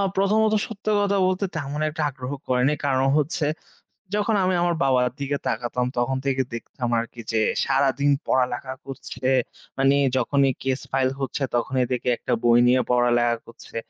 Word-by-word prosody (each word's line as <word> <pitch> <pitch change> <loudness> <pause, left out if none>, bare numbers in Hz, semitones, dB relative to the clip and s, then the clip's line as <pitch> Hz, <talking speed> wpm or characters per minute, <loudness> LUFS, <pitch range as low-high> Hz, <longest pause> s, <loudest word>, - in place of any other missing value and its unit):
প্রথমত, 215 +3 +3
সত্য 215 -3 -11
কথা 200 0 +1
বলতে 185 +2 0
তেমন 145 +1 -3
একটা 155 +1 -5
আগ্রহ 130 0 -7 0.2
করেনি। 130 +3 +2
কারণ 135 -1 +2
হচ্ছে 150 +1 0 0.7
যখন 210 +1 +1
আমি 185 0 +2
আমার 175 -1 +1
বাবার 125 -2 +3
দিকে 140 0 -1
তাকাতাম, 120 +2 -1
তখন 125 +2 +1
থেকে 135 -1 +1
দেখতাম 120 +1 -5
আরকি 115 0 -6
যে 110 - +2 0.2
সারাদিন 140 +1 +2
পড়ালেখা 130 0 0
করছে। 130 -1 -6 0.5
মানে 135 +1 +4 0.2
যখনই 135 +2 +2
কেস 135 0 0
ফাইল 130 -1 +2
হচ্ছে 135 +1 -2
তখনই 125 +1 +1
দেখি 125 0 -2
একটা - - -2
বই 120 0 +5
নিয়ে 125 +1 +4
পড়ালেখা 120 -1 +3
করছে। 115 - -15
135 Hz, 155 wpm, -24 LUFS, 125-145 Hz, 0.7 s, বই